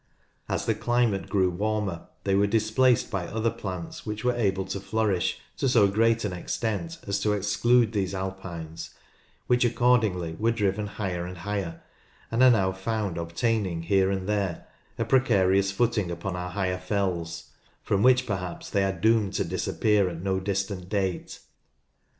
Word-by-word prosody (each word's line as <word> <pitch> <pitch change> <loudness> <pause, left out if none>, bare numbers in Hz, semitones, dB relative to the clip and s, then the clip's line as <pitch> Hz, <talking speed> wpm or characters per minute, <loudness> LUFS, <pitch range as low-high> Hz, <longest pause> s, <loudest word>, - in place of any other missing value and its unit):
As - - -1
the - - +2
climate 120 -5 0
grew 95 -2 +2
warmer 105 -2 -2 0.2
they 100 - +1
were 100 +1 +4
displaced 110 +4 +2
by 95 -4 -2
other 110 +1 0
plants 90 -6 -6
which 105 0 -5
were 125 - +3
able 95 -5 0
to 95 +1 -4
flourish 100 -1 0 0.2
to 135 - +1
so 115 -5 +5
great 115 +3 +2
an 100 - -2
extent 115 - -3
as 100 0 -1
to 105 - +1
exclude 110 +3 +3
these 100 -3 -1
"alpines," 90 -4 -6 0.5
which 125 0 +3
accordingly 110 -9 +2
were 115 +2 +2
driven 105 -2 0
higher 95 -4 -3
and 90 0 -8
higher, 100 -2 -4 0.5
and 115 +2 +1
are 130 - +8
now 95 -6 +3
found 95 -1 -2
obtaining 85 +1 -1
here 95 +2 +3
and 95 -1 -2
there 100 -5 -1 0.3
a - - 0
precarious 95 -7 +3
footing 105 -3 +1
upon 85 +2 -4
our 90 0 -4
higher 90 -1 -1
fells, 90 -4 -2 0.3
from 100 -1 +1
which 125 +1 +5
perhaps 90 -5 -4
they 100 - +2
are 95 -3 -1
doomed 110 0 +3
to - - 0
disappear 105 -3 +1
at 85 0 -7
no 95 -1 0
distant 95 -1 -3
date. 95 -3 -2
100 Hz, 160 wpm, -26 LUFS, 95-110 Hz, 0.5 s, are